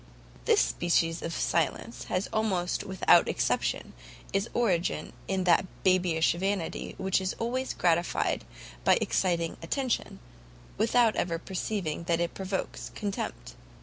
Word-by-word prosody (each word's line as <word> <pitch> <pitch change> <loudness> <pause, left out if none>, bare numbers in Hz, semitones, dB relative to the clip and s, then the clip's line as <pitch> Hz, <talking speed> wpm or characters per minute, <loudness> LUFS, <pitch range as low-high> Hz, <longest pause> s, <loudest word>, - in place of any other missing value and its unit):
This - - +5
species 165 -1 +1
of 165 - -3
silence 170 - -1
has 185 +2 -1
almost 190 -5 0
without 190 -2 +4
exception - - 0 0.4
its 195 +3 +1
origin 185 -8 0
in 190 -1 0
that 180 +1 +4 0.2
babyish 180 -3 +3
vanity 190 0 -2
which 190 0 +1
is 185 0 -2
always 255 +3 -2
gratified 170 0 +1 0.4
by - - +6
exciting 170 -3 0
attention, 255 +8 -1 0.6
without 225 +1 +3
ever 170 -1 0
perceiving 175 -2 -3
that 170 -1 +1
it 170 0 -1
provokes 190 0 -4
contempt. 200 -2 -4
185 Hz, 120 wpm, -29 LUFS, 170-200 Hz, 0.6 s, by